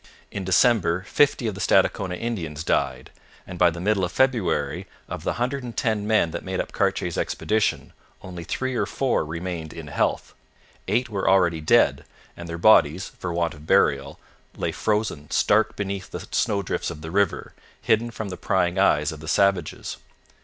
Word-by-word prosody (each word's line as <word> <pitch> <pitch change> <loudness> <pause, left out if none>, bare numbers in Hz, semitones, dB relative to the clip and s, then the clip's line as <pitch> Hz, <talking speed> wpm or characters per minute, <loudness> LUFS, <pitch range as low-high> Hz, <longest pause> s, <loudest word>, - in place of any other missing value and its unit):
In 100 - -4
December 95 -2 +3
fifty 135 +4 +2
of 110 - -1
the 95 - -7
Stadacona 90 0 +2
Indians 85 -9 -4
died, 65 -5 -1 0.3
and 90 -2 -9
by 90 - +6
the 85 +1 -7
middle 100 +1 +1
of 90 - -1
February, 130 -7 0 0.2
of - - -6
the - - -1
hundred 125 +4 -2
and 120 -2 -8
ten 110 -4 0
men 110 -7 +2
that - - -5
made - - -3
up - - -3
Cartier's - - -1
expedition, 110 0 -1 0.3
only 90 -2 -7
three 130 +10 -3
or 125 - 0
four 135 -2 0
remained 80 0 -5
in - - -8
health. - - -1 0.5
Eight 125 +1 +1
were 100 -3 0
already 90 -4 +3
dead, 75 - +3 0.3
and 85 -1 -9
their 85 - -4
bodies, 90 -2 +4
for 90 - -3
want 85 -1 -1
of 75 0 -14
burial, 70 -2 +2 0.4
lay - - -1
frozen 105 -9 -2
stark - - +2
beneath 100 -2 -4
the - - -7
snowdrifts 100 -3 -1
of 75 - -8
the 80 0 -7
river, 100 -1 0 0.3
hidden 115 +1 +1
from 110 -3 -6
the 90 - -6
prying 90 0 0
eyes 75 -6 +3
of 80 - -9
the 80 - -10
savages. 95 -4 0
95 Hz, 175 wpm, -24 LUFS, 85-110 Hz, 0.5 s, by